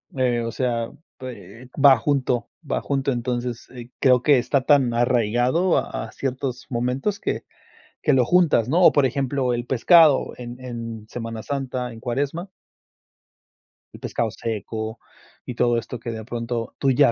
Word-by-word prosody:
Eh, 125 -2 +1
o 115 - -3
sea, 115 -2 -1 0.3
p 115 -3 -10
eh, 125 - -15
va 135 -2 +8
junto, 125 -2 0 0.2
va - - 0
junto, 135 -1 -1
entonces, 120 -1 -3
eh 120 -2 -10
creo 125 -3 +4
que 145 0 +5
está 135 +2 +1
tan 130 -4 +3
arraigado 120 - +2
a - - -3
a - - -11
ciertos 130 -1 -4
momentos 125 - -1
que - - -3 0.6
que 150 - +3
lo 130 -2 +4
juntas, 160 -8 +3
¿no?, 170 +6 +3
o - - +8
por 145 -2 +4
ejemplo, 130 -1 0
el 120 0 -3
pescado 150 +4 +5
en 125 0 -8
en 115 -3 -7
Semana 115 -2 -5
Santa, 130 -3 -3
en 115 - -11
cuaresma. 140 - -3 1.4
El - - -11
pescado 115 -2 -2
seco 110 0 -5 0.5
y 125 - -6
todo 120 -1 +2
esto 115 +1 -5
que, 120 -1 -5
de 110 -1 -6
pronto, 115 -1 -4
tú 135 -1 +3
ya 135 -1 +5
125 Hz, 165 wpm, -23 LUFS, 120-135 Hz, 1.4 s, va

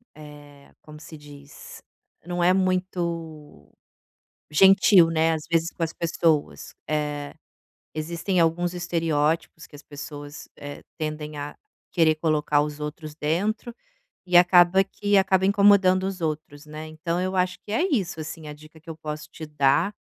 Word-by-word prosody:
eh, 145 -2 -14
como 150 0 -13
se 155 - -11
diz, 145 -1 -13 0.4
não 175 0 -2
é 180 +1 +5
muito 170 - -3 0.8
gentil, 190 +1 +6
né, 160 0 +2
às 155 -1 -4
vezes 165 0 +2
com 170 - -4
as 165 - -3
pessoas. 165 -3 -1
Eh, 150 -1 -3 0.6
existem 170 +4 -2
alguns 170 +2 +1
estereótipos 165 -1 -1
que - - -22
as 145 - -12
pessoas, 145 0 -9
eh, 145 0 -9
tendem 155 -1 -5
a 145 0 -6 0.3
querer 160 -2 +3
colocar 150 -2 +1
os 150 0 -5
outros 150 +1 -7
dentro, 205 +10 -2 0.5
e 180 -1 -2
acaba 180 +1 +6
que 205 +1 -1
acaba 190 -1 +3
incomodando 200 -2 +4
os 190 -2 -5
outros 155 -1 -4
né, 155 +1 -8
então 170 +3 -3
eu 185 +1 -2
acho 180 0 0
que 210 - -11
é 340 - +1
isso 190 - -1
assim 160 0 -7
a 150 - -7
dica 155 +2 -16
que 165 +1 -15
eu 160 - -7
posso 150 -1 -7
te 160 -1 -9
dar, 150 +6 +1
160 Hz, 155 wpm, -24 LUFS, 150-180 Hz, 0.8 s, gentil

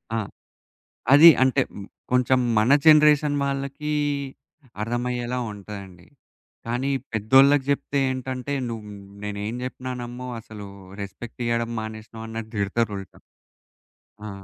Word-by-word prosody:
ఆ! - - +1 1.0
అది 155 +4 +10
అంటే 130 -2 +3
హ్మ్, 100 - -8 0.3
కొంచం 125 0 +3 0.2
మన 110 +4 +3
జనరేషన్ 150 -1 +6
వాళ్ళకీ 140 +2 -3 0.9
అర్థమయ్యేలా 120 +1 -2
ఉంటదండి. 100 -3 -10 0.6
కాని 120 +3 -2
ఈ - - +1 0.2
పెద్దోళ్ళకి 135 +6 +5
జెప్తే 140 0 0
ఏంటంటే 130 +1 -4 0.2
"నువ్వు 110 -2 -6 0.4
నేనేం 105 +2 -4
జేప్పినా 130 0 -5
నమ్మవు 125 +1 -6
అసలు 105 -2 -10 0.3
రెస్పెక్ట్ 100 +5 -8
ఇయ్యడం 115 0 0
మానేసినవు" 110 +1 -8
అన్నట్టు 110 0 -6
తిడతరు 105 +2 0
ఉల్టా. 95 - -11 1.1
ఆ! - - -5
120 Hz, 110 wpm, -24 LUFS, 110-130 Hz, 1.1 s, అది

